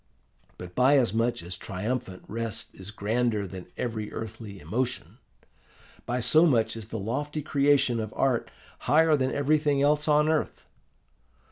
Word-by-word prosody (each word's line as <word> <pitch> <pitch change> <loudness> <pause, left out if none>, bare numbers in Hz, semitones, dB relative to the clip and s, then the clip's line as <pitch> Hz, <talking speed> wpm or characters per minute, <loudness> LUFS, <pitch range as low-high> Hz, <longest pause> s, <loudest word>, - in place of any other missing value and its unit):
But 90 0 -9
by 130 +5 +5
as 120 -7 +2
much 115 0 0
as 90 +2 -6
triumphant 95 +2 -4
rest 115 0 -3
is 95 +1 -9
grander 110 0 0
than 95 -1 -9
every 110 -3 -3
earthly 110 -3 -7
emotion, 125 - -3 0.9
by 120 +1 -1
so 155 +8 +5
much 115 -6 +2
is 110 -2 -8
the 110 - -5
lofty 145 +9 -3
creation 140 -4 +2
of 110 -1 -4
art 130 -3 +1 0.4
higher 160 +1 +5
than 130 -2 0
everything 145 0 +2
else 150 +1 +2
on 150 0 +4
earth. 155 -1 -1
120 Hz, 145 wpm, -27 LUFS, 110-145 Hz, 0.9 s, by